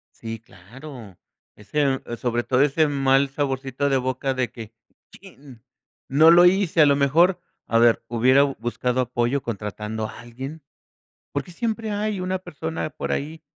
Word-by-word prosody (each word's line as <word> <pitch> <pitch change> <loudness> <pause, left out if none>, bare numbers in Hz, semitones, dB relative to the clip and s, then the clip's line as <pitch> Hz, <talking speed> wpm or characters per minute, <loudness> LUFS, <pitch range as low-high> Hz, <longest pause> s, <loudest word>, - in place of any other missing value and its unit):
Sí, 115 0 -7
claro. 115 - -13 0.4
Ese, 135 +5 -1
eh, 120 - -6
sobre 120 0 -1
todo 130 +1 +1
ese 150 +2 +3
mal 135 -1 +2
saborcito 135 0 -2
de 135 - +2
boca 130 +1 -2
de 130 -1 -2
que: 115 -2 -10 0.4
"¡Chin!, 140 - -15 0.5
no 155 +5 +6
lo 175 +1 +7
hice", 180 -3 +3
a - - +8
lo 140 - +4
mejor, 165 +7 +3 0.3
a 115 - +2
ver, 120 0 +4
hubiera 130 +4 +4
buscado 125 -1 -2
apoyo 125 +2 -1
contratando 105 0 -4
a - - -11
alguien. 130 +6 -9 0.7
Por - - -2
qué - - -14
siempre 220 +2 -3
hay 210 -1 -2
una 185 +1 -2
persona 160 -2 -5
por - - -5
ahí 155 +3 -4
135 Hz, 160 wpm, -23 LUFS, 120-155 Hz, 0.7 s, a